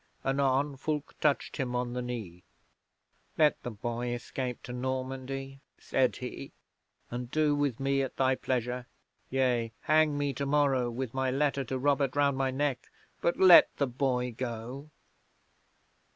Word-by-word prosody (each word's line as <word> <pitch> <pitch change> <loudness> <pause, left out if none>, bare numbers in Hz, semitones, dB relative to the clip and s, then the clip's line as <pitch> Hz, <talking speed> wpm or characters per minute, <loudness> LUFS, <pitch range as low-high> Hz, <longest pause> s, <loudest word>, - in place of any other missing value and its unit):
Anon, 135 +1 +1
Fulke 150 +1 -3
touched 150 -2 +1
him 125 -2 -2
on 125 0 -1
the 125 - -2
knee. 110 -8 -6 0.9
'"Let 150 -1 +3
the - - -4
boy 120 +2 -3
escape 125 0 -5
to 125 - -7
Normandy," 130 +1 -4 0.2
said 130 -1 +1
he, 125 - -7 0.6
"and 120 0 -4
do 150 +1 +2
with 145 -5 0
me 135 0 +1
at 135 - -3
thy 130 0 +3
pleasure. 125 -1 -2 0.4
Yea, 125 -3 +1
hang 155 -1 +3
me 145 -1 0
tomorrow, 140 -2 +1
with 120 0 -4
my 130 0 0
letter 140 +1 +1
to 130 +2 -3
Robert 140 0 +1
round 140 -1 +3
my 135 0 0
neck, 135 0 -2 0.3
but 170 - +1
let 185 -2 +8
the 140 - +2
boy 125 -1 -1
go." 125 +4 -5
130 Hz, 145 wpm, -30 LUFS, 125-140 Hz, 0.9 s, let